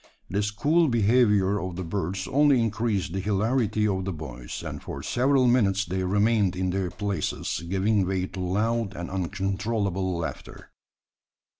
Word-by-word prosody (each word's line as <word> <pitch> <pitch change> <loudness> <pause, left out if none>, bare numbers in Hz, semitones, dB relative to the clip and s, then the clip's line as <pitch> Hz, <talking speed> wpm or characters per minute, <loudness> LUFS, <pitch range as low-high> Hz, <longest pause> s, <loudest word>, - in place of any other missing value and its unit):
This 100 +2 0
cool 155 +11 +2
behaviour 105 -4 +3
of 95 -2 -5
the 90 - -4
birds 95 +2 -3
only 140 -1 +4
increased 110 -5 -1
the 95 - -1
hilarity 105 +2 +1
of 95 -2 -1
the 95 - -2
boys; 65 -7 -7
and - - -6
for - - -7
several 130 +1 +2
minutes 100 -6 +3
they 95 +2 -2
remained 100 0 +2
in 95 0 -1
their 95 -1 -1
places, 100 -4 -3
giving 95 +1 +1
way 95 -1 0
to 95 - -8
loud 105 +3 0
and 85 +1 -6
uncontrollable 95 0 -1
laughter. 85 - -7
100 Hz, 150 wpm, -26 LUFS, 95-115 Hz, -, only